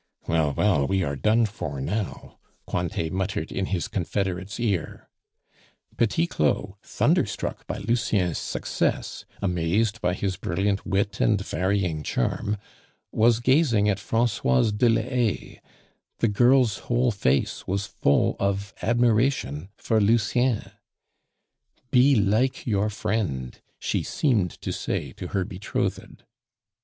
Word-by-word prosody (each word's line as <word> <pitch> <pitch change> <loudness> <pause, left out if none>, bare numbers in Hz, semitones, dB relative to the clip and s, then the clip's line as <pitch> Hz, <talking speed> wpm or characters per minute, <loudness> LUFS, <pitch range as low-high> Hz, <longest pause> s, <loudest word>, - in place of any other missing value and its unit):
"Well, 80 -3 +2
well, 80 -10 +2
we 95 -1 +1
are 70 -3 -2
done 110 - +3
for 75 -9 -5
now," 95 +9 -4 0.3
Cointet 85 -2 -2
muttered 95 -4 -2
in 95 - -2
his 90 -4 -1
confederate's 95 +1 -3
ear. 100 -8 -2 0.9
Petit 120 +9 +2
Claud, 85 - 0
thunderstruck - - 0
by - - -3
Lucien's 105 -6 0
success, - - -2 0.2
amazed 100 +5 0
by 90 0 +1
his 95 -2 -2
brilliant 95 +2 -1
wit 100 +1 0
and 105 -3 +3
varying 95 -4 0
charm, 100 +10 -1 0.5
was 115 +1 +3
gazing 125 -4 +3
at 100 -1 0
Francoise 105 - +1
de 115 +4 +3
la 115 0 +2
Haye; 120 -3 -2 0.6
the 115 - +2
girl's 120 0 +4
whole 120 0 +3
face 70 - 0
was 100 +2 -1
full 70 -7 +1
of 100 0 -1
admiration 115 - +1
for 110 -1 +1
Lucien. 115 +2 +2 1.2
"Be 135 +2 +5
like 110 +5 +1
your 105 -2 +1
friend," 100 - -2 0.2
she - - -1
seemed 110 - +1
to - - -3
say - - -3
to 90 - -7
her 95 -1 -1
betrothed. 95 +3 -4
100 Hz, 125 wpm, -25 LUFS, 90-115 Hz, 1.2 s, Be